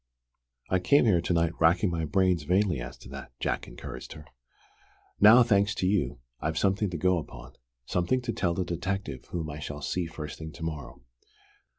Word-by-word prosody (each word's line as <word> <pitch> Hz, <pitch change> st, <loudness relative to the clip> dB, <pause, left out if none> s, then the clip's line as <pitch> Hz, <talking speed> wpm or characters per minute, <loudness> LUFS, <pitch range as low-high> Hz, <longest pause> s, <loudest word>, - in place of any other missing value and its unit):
"I 95 Hz, -, +3 dB
came 140 Hz, +9 st, +4 dB
here 90 Hz, -7 st, +4 dB
to 85 Hz, -, -2 dB
night 85 Hz, -1 st, +2 dB
racking 85 Hz, +3 st, +4 dB
my 80 Hz, -1 st, -1 dB
brains 90 Hz, +1 st, +2 dB
vainly 90 Hz, 0 st, +1 dB
as -, -, -7 dB
to -, -, -13 dB
that," 70 Hz, -2 st, -9 dB
Jack -, -, -2 dB
encouraged 65 Hz, +1 st, -8 dB
her. 75 Hz, -, -12 dB, 0.9 s
"Now, 110 Hz, +4 st, +8 dB
thanks 105 Hz, -2 st, +2 dB
to -, -, -1 dB
you, 90 Hz, -12 st, +1 dB, 0.2 s
I've 80 Hz, +1 st, -2 dB
something 100 Hz, +1 st, +1 dB
to 90 Hz, -, -4 dB
go 90 Hz, +2 st, +2 dB
upon, 65 Hz, -5 st, -10 dB, 0.3 s
something 90 Hz, -, +1 dB
to 120 Hz, -2 st, -2 dB
tell 85 Hz, -2 st, 0 dB
the 95 Hz, -, -1 dB
detective 90 Hz, -5 st, -3 dB
whom 80 Hz, -3 st, -4 dB
I 75 Hz, -, -7 dB
shall 75 Hz, -1 st, -6 dB
see 85 Hz, +4 st, -1 dB
first 75 Hz, -2 st, -7 dB
thing 80 Hz, 0 st, -7 dB
to 80 Hz, -, -9 dB
morrow. 70 Hz, -7 st, -6 dB
85 Hz, 190 wpm, -28 LUFS, 75-95 Hz, 0.9 s, Now